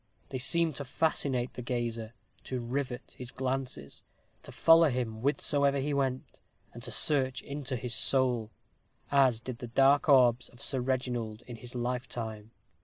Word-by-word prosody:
They 130 - -4
seemed 165 +2 +2
to 140 - -3
fascinate 130 -3 -1
the - - -6
gazer 115 -2 -3 0.3
to 130 - -3
rivet 125 +1 -4
his 125 -1 -7
glances 130 - -4 0.4
to - - -11
follow 165 -1 +6
him 120 -4 -3
whithersoever 140 +1 +2
he 145 +2 -1
went 130 -2 -2 0.3
and - - -9
to - - -5
search 130 -4 +1
into 140 -2 -4
his 125 0 -3
soul, 120 -1 +3 0.6
as 130 -5 +4
did 120 -1 -6
the 120 - -6
dark 135 +5 +4
orbs 125 -3 +5
of 120 - -19
Sir 130 - 0
Reginald 125 -4 -2
in 120 -2 -8
his 120 +2 -11
lifetime. 120 -3 -4
125 Hz, 155 wpm, -30 LUFS, 120-135 Hz, 0.6 s, follow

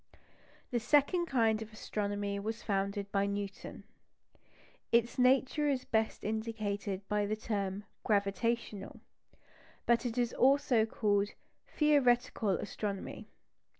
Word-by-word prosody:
The 240 - +1
second 295 +8 +3
kind 225 -5 +2
of 220 0 -7
astronomy 205 -1 -3
was 220 +3 -4
founded 200 0 -1
by 200 0 +1
Newton. 200 0 -5 1.1
Its 235 +1 +2
nature 265 +4 +3
is 260 -2 -1
best 220 0 0
indicated 210 -3 -3
by 210 -1 0
the 215 - 0
term 205 -2 -3 0.2
"gravitational"; 205 0 -1 0.8
but 235 0 +3
it 240 -1 -3
is 240 -1 +1
also 260 -4 +3
called 205 -2 0 0.3
"theoretical 250 -7 +2
astronomy." 200 +1 -3
220 Hz, 110 wpm, -32 LUFS, 200-240 Hz, 1.1 s, second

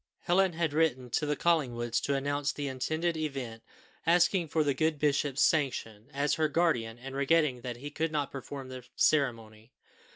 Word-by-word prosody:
Helen 180 +1 +2
had 160 -2 -1
written 130 -6 +1
to 150 - 0
the 150 - +1
Collingwoods 120 -9 +1
to 140 - 0
announce 145 +1 -1
the 145 -1 -4
intended 155 +6 -1
event, 135 -8 -4 0.4
asking 175 +1 +3
for 155 +1 +1
the 145 -1 +1
good 155 +1 0
bishop's 145 -1 +1
sanction, 120 -8 0
as 140 +1 0
her 155 - +4
guardian, 140 -8 0
and 135 +2 -8
regretting 140 -2 +2
that 120 -1 -5
he 145 +4 -7
could 160 +2 -2
not 145 -3 -1
perform 135 0 -7
the 130 -1 -8
ceremony. 115 -6 0
145 Hz, 170 wpm, -30 LUFS, 125-160 Hz, 0.4 s, her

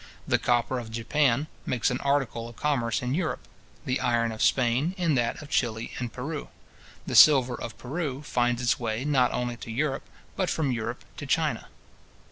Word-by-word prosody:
The - - +3
copper 120 +1 +1
of 115 -2 -7
Japan 125 +4 +1 0.2
makes 120 -2 0
an 125 - -1
article 135 -5 0
of 120 - -13
commerce 125 -6 0
in 125 +1 -1
Europe; 165 0 -2 0.4
the 130 -2 0
iron 115 -1 +1
of 110 - -6
Spain 130 +8 +2
in 170 -4 +1
that 120 -3 0
of 145 - -12
Chili 115 -2 0
and 120 -2 -3
Peru. 145 +6 -5 0.6
The - - -4
silver 130 -5 +7
of 115 -2 -6
Peru 140 0 -4
finds 120 -3 0
its 120 - +2
way, 115 +2 -2
not 135 -4 +3
only 120 -1 -2
to 115 - -9
Europe, 135 +4 -2 0.3
but 185 -3 0
from 150 -5 0
Europe 115 -2 -4
to - - -6
China. - - 0
125 Hz, 180 wpm, -27 LUFS, 115-145 Hz, 0.6 s, silver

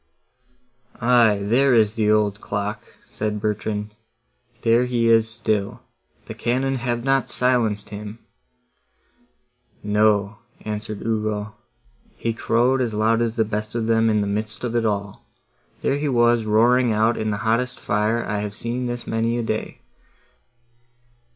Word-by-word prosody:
"Aye, 115 -4 +4
there 125 +5 +3
is 110 -2 +3
the 110 -2 0
old 105 -1 +2
clock," 100 +1 -3 0.3
said 105 0 -3
Bertrand, 105 0 -3 0.7
"there 115 +2 +4
he 120 -2 0
is 115 -1 +4
still; 110 -3 -2 0.4
the - - -7
cannon 130 +3 -1
have 120 -1 -2
not 135 0 +1
silenced 115 -5 +1
him!" 105 +1 -7 1.7
"No," 105 0 +2 0.2
answered 105 -1 -5
Ugo, 110 -1 -2 0.6
"he 115 - -2
crowed 125 +3 +1
as 115 -4 -1
loud 110 +2 +2
as 115 -1 -1
the 110 - +2
best 105 +1 -4
of 115 -1 -1
them 115 0 +3
in 105 -1 +2
the - - 0
midst 105 +3 -4
of 120 -1 -2
it 115 -1 +2
all. 100 -1 -3 0.6
There 140 - +1
he 145 0 -1
was 120 -2 +3
roaring 120 +3 +3
out 110 +2 +2
in 110 - -2
the 105 - -1
hottest 120 +3 0
fire 105 +3 0
I 105 - -2
have 105 0 -5
seen 120 +3 -3
this 120 0 -5
many 115 +1 -1
a 120 - -1
day! 110 -1 -4
110 Hz, 145 wpm, -22 LUFS, 105-120 Hz, 1.7 s, Aye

